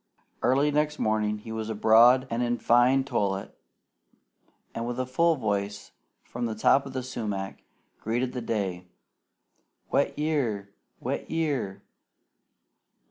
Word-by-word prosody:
Early 140 +3 +3
next 150 +1 0
morning 105 -1 0
he 110 +2 -10
was 110 0 -4
abroad 115 +4 +5
and 115 +1 -1
in 120 0 0
fine 125 +4 +4
toilet, 100 -7 -2 1.2
and 115 +1 -4
with 120 +1 -3
a 130 - 0
full 165 +6 +2
voice 100 -4 -3 0.3
from 120 0 -4
the 110 - -4
top 135 +5 +3
of 135 - -9
the 130 -1 -3
sumac 105 -6 -4 0.4
greeted 120 +3 -1
the 125 - -4
day 95 -6 -3 1.0
"Wet - - +1
year! 120 -10 -1 0.3
Wet - - -4
year!" 140 -12 -2
120 Hz, 130 wpm, -27 LUFS, 105-130 Hz, 1.2 s, abroad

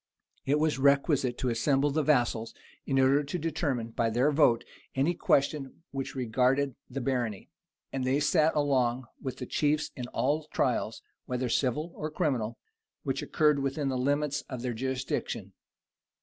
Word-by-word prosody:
It 145 +2 +3
was 150 -2 +1
requisite 140 -2 +3
to 130 - -1
assemble 135 +4 +2
the 155 +3 +1
vassals, 120 -6 +1 0.3
in 135 - +1
order 135 +2 +4
to 145 +5 -3
determine 145 -7 -1
by 115 0 +1
their 125 +6 +2
vote 140 -6 +4 0.3
any 140 +6 +2
question 140 -1 0
which 135 -1 -4
regarded 130 +3 +1 0.2
the 135 +1 -4
barony; 120 -5 -2 0.4
and 135 -1 -1
they 130 +2 +2
sat 155 +2 +3
along 130 -4 +1 0.2
with 130 - -4
the 125 - -5
chief 150 +3 0
in 125 -1 -5
all 145 +5 0
trials, - - -1 0.2
whether 125 0 -1
civil 145 +7 0
or 155 - -4
criminal, 120 -7 -1 0.5
which - - -1
occurred 150 -2 +2
within 140 +1 -1
the 130 - -1
limits 145 +2 0
of 125 -2 -5
their 125 -1 -1
jurisdiction. 130 +2 -3
135 Hz, 155 wpm, -29 LUFS, 125-145 Hz, 0.5 s, order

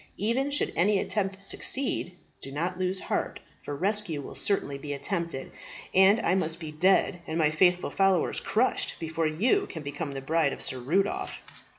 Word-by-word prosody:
Even 235 +7 0
should 285 - +1
any 200 +4 +3
attempt 195 -1 -2
succeed, 220 -2 +1 0.3
do 135 - -7
not 175 +6 -2
lose 185 +1 -1
heart, - - -2 0.2
for 145 - -5
rescue 195 -1 -1
will 140 - -8
certainly 140 -9 -1
be 145 +1 -5
attempted; 165 0 -3 0.4
and 190 +4 +6
I - - +2
must 165 -3 0
be 160 -3 -6
dead, 180 +3 +2
and 160 - -2
my 155 -2 +3
faithful 180 +3 +3
followers 195 -3 +2
crushed, - - 0
before 165 0 -1
you 240 - +1
can 160 - -7
become 145 +1 -5
the 135 - -4
bride 155 0 +1
of - - -6
Sir 130 - -2
Rudolph." 180 +11 -1
175 Hz, 175 wpm, -28 LUFS, 155-195 Hz, 0.4 s, and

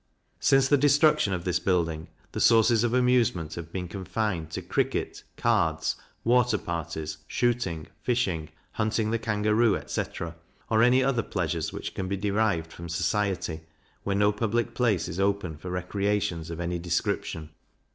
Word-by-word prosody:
Since 135 -1 +4
the 145 0 +4
destruction 145 -5 +4
of 90 -2 -2
this 90 0 0
building, 85 -4 0 0.2
the - - -4
sources 115 0 +5
of 120 - +1
amusement 120 -10 +2
have 85 -1 -7
been 90 -1 -4
confined 95 -2 -3
to 80 - -5
cricket, - - -1 0.2
cards, 85 -9 +1 0.3
water 125 +1 +3
parties, 80 -2 -4
shooting, 115 -11 0 0.2
fishing, 95 -11 0 0.2
hunting 110 0 0
the 115 - 0
kangaroo, 105 0 +2
etc. 85 -1 -4 0.4
or 110 0 +4
any 125 +2 +5
other 130 -3 +2
pleasures 85 -6 -2
which - - -6
can 95 - -3
be 100 +1 -2
derived 100 -5 0
from 85 0 -8
society 90 -1 -1 0.4
where 100 - -1
no 105 +1 +4
public 115 +3 -1
place 115 -9 +1
is 85 +1 -5
open 100 -4 0
for 80 +5 -8
recreations 90 -2 -1
of 85 0 -6
any 85 0 -2
description. 85 -2 -2
100 Hz, 150 wpm, -27 LUFS, 85-115 Hz, 0.4 s, sources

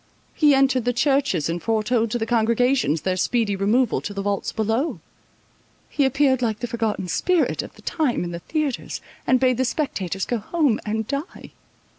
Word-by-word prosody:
He 295 -3 +4
entered 270 -3 +2
the 245 - +1
churches, 270 - +1
and 170 +1 -3
foretold 225 +1 +1
to 240 - -1
the 225 - -2
congregations 230 - +2
their 185 +3 0
speedy 215 +1 0
removal 220 +5 +1
to 205 - -6
the 200 - -3
vaults 200 0 -1
below. 225 - -1 0.9
He 285 - +2
appeared 265 -1 +2
like 220 -3 0
the 240 - -4
forgotten 225 -5 -2
spirit 345 - +1
of - - -11
the - - -17
time 285 - 0
in 175 - -4
the 170 - -5
theatres, 300 - -3 0.3
and 255 - +4
bade 255 -2 +2
the 260 - +2
spectators 195 - -2
go 240 - -1
home 280 0 +1
and 220 0 -2
die. 280 +4 -5
235 Hz, 180 wpm, -23 LUFS, 205-270 Hz, 0.9 s, He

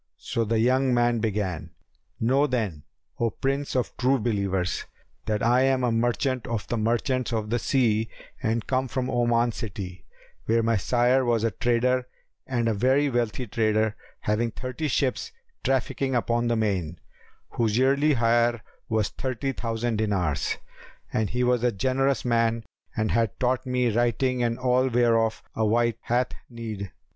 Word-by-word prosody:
So 115 - -2
the 115 +1 0
young 130 +2 +3
man 120 -1 +2
began,—"Know 105 - -2
then, 110 - -2 0.4
O 115 - +2
Prince 135 +4 -2
of 125 - -1
True 130 +2 +3
Believers, 100 -6 -1 0.4
that 105 -1 0
I 120 +2 +4
am 135 -1 +2
a 120 - +2
merchant 120 +2 0
of 115 -3 -3
the - - -1
merchants 120 +3 0
of 110 -2 -2
the 120 - +1
sea 115 -4 +1 0.3
and 110 0 0
come 130 0 0
from 130 +1 -2
Oman 120 -1 +2
city, 95 -4 -6 0.4
where 115 +1 +3
my 115 0 +2
sire 125 +5 +2
was 120 -3 +1
a 115 - +2
trader 125 +3 +1 0.4
and 120 -3 0
a 115 - +2
very 130 +6 +2
wealthy 120 0 -1
trader 110 -1 +1 0.3
having 110 +3 0
thirty 130 +6 -4
ships 135 - 0 0.3
trafficking 135 0 0
upon 120 0 +1
the 120 - +2
main, 95 -7 -1 0.5
whose 115 -2 0
yearly 140 +4 +3
hire 120 -1 +2 0.3
was 110 -2 +1
thirty 130 +1 -3
thousand 115 -2 -2
dinars; 95 -8 0 0.6
and 110 -1 +1
he 125 +1 0
was 125 -1 +2
a 125 - +3
generous 130 +5 0
man 115 -1 +1 0.3
and 110 0 +1
had 115 -2 0
taught 130 +1 0
me 125 -2 +1
writing 120 +2 +1
and 120 -1 0
all 125 0 +2
whereof 115 -2 +2
a 110 - 0
wight 115 +1 +2
hath 125 +2 0 0.2
need. 110 -5 -6
120 Hz, 155 wpm, -26 LUFS, 110-125 Hz, 0.6 s, I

